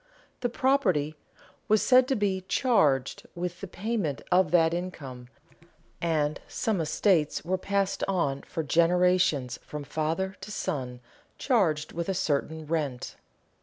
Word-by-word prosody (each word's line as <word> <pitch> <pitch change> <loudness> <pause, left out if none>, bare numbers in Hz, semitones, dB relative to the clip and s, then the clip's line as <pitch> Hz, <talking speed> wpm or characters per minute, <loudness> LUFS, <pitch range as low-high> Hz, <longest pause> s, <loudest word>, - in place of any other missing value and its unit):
The 245 - -1
property 200 - +1 0.5
was 215 0 +3
said 255 0 +5
to 270 - +1
be 200 -4 0
"charged" 200 - +2
with 175 0 -4
the 195 - -5
payment 195 - -3
of 180 -2 +4
that 165 -1 +4
income, 140 -9 -6 0.7
and 155 -3 0
some 215 -7 -1
estates 160 -1 +1
were 185 +2 0
passed 200 0 -1
on 155 -8 0
for 160 - -4
generations 170 -4 +2
from 150 -1 -7
father 160 +6 -2
to 200 +2 -8
son 130 -11 -4 0.4
charged 170 - +1
with 170 +2 -4
a 190 - 0
certain 160 -1 -1
rent. 150 -5 -3
175 Hz, 130 wpm, -28 LUFS, 150-195 Hz, 0.7 s, said